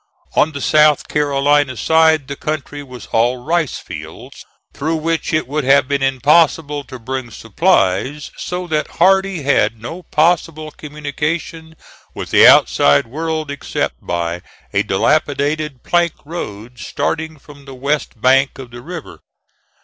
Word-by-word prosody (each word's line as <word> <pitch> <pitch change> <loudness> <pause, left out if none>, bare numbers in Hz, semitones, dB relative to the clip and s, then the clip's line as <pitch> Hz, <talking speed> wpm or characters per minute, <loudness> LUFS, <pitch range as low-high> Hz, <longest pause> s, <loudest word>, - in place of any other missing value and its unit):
On 155 - +3
the 140 -2 -6
South 150 0 +3
Carolina 145 -2 +1
side 160 -2 +3
the 140 - -5
country 145 -1 -4
was 125 -5 -11
all 120 +3 +2
rice 160 +4 -1
fields, - - -10 0.3
through 160 +3 -2
which 165 +1 -2
it 155 -4 0
would 150 +2 -2
have 135 0 +4
been 140 0 -1
impossible 145 +2 +2
to 130 - -9
bring 130 +1 -5
supplies 115 - 0
so 180 0 -4
that 155 -3 -3
Hardee 190 -2 +3
had 115 -5 +1
no 165 +11 -7
possible 155 -1 0
communication 150 +2 -5 0.4
with - - -6
the - - +7
outside 70 +6 +5
world 155 +3 -3
except 145 - -3
by 85 0 -3 0.3
a - - +3
dilapidated 150 -2 0
plank 175 -1 +1
road 120 -7 -7
starting 160 0 -3
from 145 0 -16
the 135 -1 -10
west 140 -2 -2
bank 135 +3 +3
of 130 -3 -10
the 120 0 -10
river. 165 +3 -9
145 Hz, 140 wpm, -17 LUFS, 130-160 Hz, 0.4 s, the